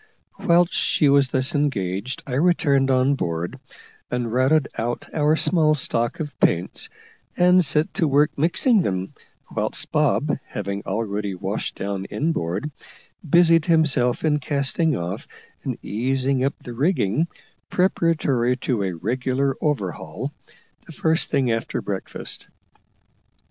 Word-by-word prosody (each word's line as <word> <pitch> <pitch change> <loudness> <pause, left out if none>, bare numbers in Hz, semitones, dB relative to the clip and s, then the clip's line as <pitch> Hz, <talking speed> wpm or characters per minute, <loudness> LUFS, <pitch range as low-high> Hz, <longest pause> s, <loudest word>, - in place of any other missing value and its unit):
Whilst 175 -2 +3
she 150 - +2
was 140 -1 +4
thus 130 +1 0
engaged 120 - -1
I 130 - -6
returned 140 -3 +2
on 130 +1 +3
board, 85 -8 -3 0.5
and 120 -2 -2
routed 135 +4 +3
out 120 +2 -3
our 150 0 +3
small 160 -2 +3
stock 120 -4 -1
of 150 -3 -6
paints, 85 +1 +1 0.5
and 180 +1 +5
set 150 +1 +1
to 165 - +1
work 145 +2 +3
mixing 180 - +3
them, 95 - -2 0.4
whilst - - -1
Bob, - - +1
having 100 0 -4
already 100 -1 -2
washed 95 +3 -4
down 100 -1 -4
inboard, 140 - -2 0.6
busied 165 0 +5
himself 155 -7 +2
in 150 -1 +2
casting 145 +3 0
off 85 +2 -5 0.4
and - - -3
easing 130 +4 0
up 140 - 0
the 120 - -9
rigging 145 - +1 0.4
preparatory 155 -9 +1
to 125 -4 -1
a 95 -2 -1
regular 130 +8 -1
overhaul, 130 -12 -2 0.6
the 165 - -10
first 160 +2 +1
thing 130 -4 +1
after 115 0 -2
breakfast. 100 -2 -4
135 Hz, 130 wpm, -23 LUFS, 110-155 Hz, 0.6 s, and